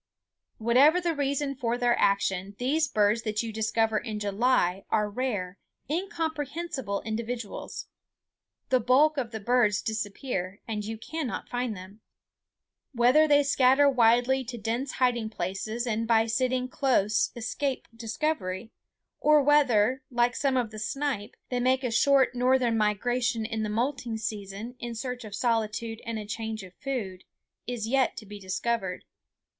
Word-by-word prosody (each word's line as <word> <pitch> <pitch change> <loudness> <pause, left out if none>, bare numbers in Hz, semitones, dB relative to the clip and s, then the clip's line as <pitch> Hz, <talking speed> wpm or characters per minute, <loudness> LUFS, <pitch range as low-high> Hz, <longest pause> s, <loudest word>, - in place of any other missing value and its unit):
Whatever 260 +9 +5
the 345 -2 0
reason 280 -1 -1
for 240 -2 -1
their 245 -1 +2
action, 195 0 +1
these 300 +5 +1
birds 210 -2 +2
that 215 -1 -2
you 225 -1 -5
discover 220 0 +1
in 220 -2 -5
July 200 -2 +1
are 210 -1 +2
rare, 205 -5 -3 0.3
incomprehensible 315 - -3
individuals. 230 0 -5 0.8
The 255 - +4
bulk 275 +6 +4
of 250 -4 -1
the 220 -1 -6
birds 215 -2 +2
disappear, 205 -2 -3
and 215 -2 -3
you 220 +2 -5
cannot 300 +3 -5
find 245 -4 -2
them. 190 +4 -12 0.9
Whether 255 +6 +5
they 290 -1 +5
scatter 275 0 +4
widely 250 +1 +4
to 240 +1 -6
dense 235 +5 -2
hiding 240 -3 +1
places 220 +3 -3
and 225 -1 -1
by 225 -1 +4
sitting 255 +2 0
close 220 -6 +2
escape 260 +4 -3
discovery, 225 -4 -3 0.5
or 300 -1 +5
whether, 265 -4 +4
like 240 0 +1
some 270 -2 +1
of 235 -4 0
the 215 - -7
snipe, 255 -2 -3
they 250 - -1
make 260 +2 +2
a 250 - -1
short 265 +3 +4
northern 250 -1 +2
migration 225 +2 0
in 220 0 -3
the 215 - -2
molting 240 +1 -1
season 210 +2 -5
in 240 0 -5
search 250 +1 -4
of 210 -2 -7
solitude 225 0 -1
and 230 -1 -2
a 210 - -5
change 220 0 -4
of 185 -1 -12
food, 200 -8 -4 0.4
is 240 -3 -3
yet 265 +2 +1
to 215 - -7
be 205 0 -9
discovered. 195 0 -2
235 Hz, 150 wpm, -27 LUFS, 215-260 Hz, 0.9 s, Whatever